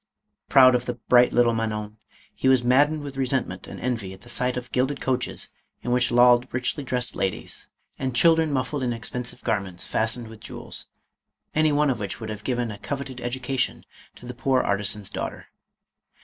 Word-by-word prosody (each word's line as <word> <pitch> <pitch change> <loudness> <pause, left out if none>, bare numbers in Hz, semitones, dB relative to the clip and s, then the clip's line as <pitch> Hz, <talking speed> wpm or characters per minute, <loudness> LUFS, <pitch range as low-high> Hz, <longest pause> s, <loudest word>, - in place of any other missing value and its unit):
Proud 130 -1 +8
of 125 0 0
the 125 - -2
bright 120 +1 +4
little 120 -1 +4
Man 115 -1 -1
on, 105 0 -5 0.4
he - - -1
was 130 -2 +5
maddened 145 +5 +3
with 140 -1 -7
resentment 130 -8 -1
and - - -8
envy 115 -7 -2
at 95 - -14
the 120 - -14
sight 125 +1 0
of 125 -1 -6
gilded 135 +2 0
coaches 130 -2 -1 0.3
in 120 - -2
which 125 0 +3
lolled 120 0 +5
richly 125 +4 -1
dressed 125 -1 -2
ladies, 95 -2 -3 0.3
and 130 -2 -2
children 160 +2 +4
muffled 140 +1 -1
in 125 - 0
expen 120 +1 -4
sive - - -9
garments 95 -4 -2
fastened 115 +1 -1
with 110 -1 -12
jewels, 110 - -8 0.7
any 155 0 +3
one 145 -1 +3
of 125 - -3
which 100 -2 -4
would 110 -1 -5
have 105 -1 -7
given 120 -3 -1
a 100 - -8
coveted 135 0 -5
education 125 +1 -2 0.3
to - - -13
the 125 - -6
poor 130 +1 +1
arti 100 +1 0
san's 105 -1 0
daughter. - - -5
125 Hz, 190 wpm, -25 LUFS, 115-130 Hz, 0.7 s, Proud